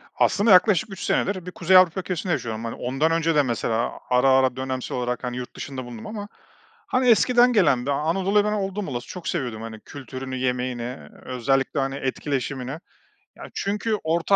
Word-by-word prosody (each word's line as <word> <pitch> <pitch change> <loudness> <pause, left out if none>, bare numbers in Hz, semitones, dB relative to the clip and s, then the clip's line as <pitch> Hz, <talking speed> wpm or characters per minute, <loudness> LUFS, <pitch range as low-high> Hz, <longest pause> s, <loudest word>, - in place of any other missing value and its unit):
Aslında 205 +1 +3
yaklaşık 200 +3 +5
3 190 - -7
senedir 185 -3 0
bir 180 - -6
Kuzey 185 +2 +4
Avrupa 185 0 +5
ülkesinde 180 -1 -2
yaşıyorum. 115 -4 -3
Hani, 115 - -4
ondan 135 +6 0
önce 165 -1 +1
de 145 - +5
mesela 115 -1 -1 0.2
ara 125 +2 +4
ara 130 -1 +4
dönemsel 130 -1 -4
olarak, 125 +1 -2
hani, 125 0 -3
yurt 125 - -7
dışında 130 -3 -6
bulundum 120 -3 -8
ama, 205 -2 -6 0.6
hani, 255 0 +1
eskiden 245 +2 +5
gelen 140 - +3
bir 140 - 0
Anadolu'yu 185 +8 +2
ben 210 - 0
oldum 195 -1 -2
olası 120 -1 -5
çok 180 -2 -8
seviyordum. 125 -9 -2
Hani, 110 -1 -7
kültürünü, 130 0 -7
yemeğini, 125 -1 -1
eee, 125 +3 -7 0.2
özellikle, 135 +3 0
hani, 135 0 -1
etkileşimini. 135 -1 -3 0.6
Ya, - - -11
çünkü 210 +2 -1
Orta 170 +4 +2
140 Hz, 180 wpm, -24 LUFS, 125-185 Hz, 0.6 s, yaklaşık